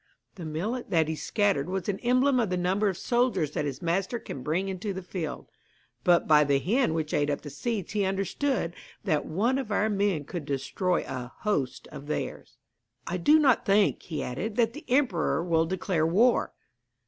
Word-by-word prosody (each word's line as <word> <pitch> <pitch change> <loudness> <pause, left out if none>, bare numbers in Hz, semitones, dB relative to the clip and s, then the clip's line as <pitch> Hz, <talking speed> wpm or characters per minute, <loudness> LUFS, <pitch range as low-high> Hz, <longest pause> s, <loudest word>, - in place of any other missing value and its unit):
The 175 -5 -8
millet 200 +11 -3
that 160 -3 +2
he 160 - -2
scattered 195 -4 0
was 190 -1 -3
an 195 -2 -1
emblem 255 +2 +3
of 225 -5 +1
the 180 - 0
number 190 +4 +1
of 185 - -4
soldiers 240 - +1
that 150 - -2
his 140 +4 -5
master 190 +7 0
can 140 - -7
bring 170 +8 -1
into 195 +2 -3
the 190 0 -6
field; 170 -5 -5 0.6
but 175 -1 +4
by 150 -1 +6
the 140 -1 +2
hen 205 - +1
which 155 -2 -2
ate 145 0 +2
up 145 - -1
the 145 - -8
seed 205 - -3
he 210 -1 0
understood 195 - -1 0.3
that 155 -8 0
one 230 +11 +1
of 230 -6 -5
our 210 +1 +2
men 200 -6 +1
could 170 -1 -5
destroy 155 +6 -1
a 125 -1 -6
host 140 - -1
of 145 -1 -9
theirs.' 150 - -4 0.5
'I 180 - -2
do 295 - +5
not 275 -6 +4
think,' 200 0 +3
he 155 -4 -4
added, 185 - -4
'that 230 -1 +2
the 300 - -10
emperor 240 - +2
will 165 -2 +2
declare 180 -3 0
war.' 225 +9 +3
185 Hz, 195 wpm, -27 LUFS, 155-215 Hz, 0.6 s, by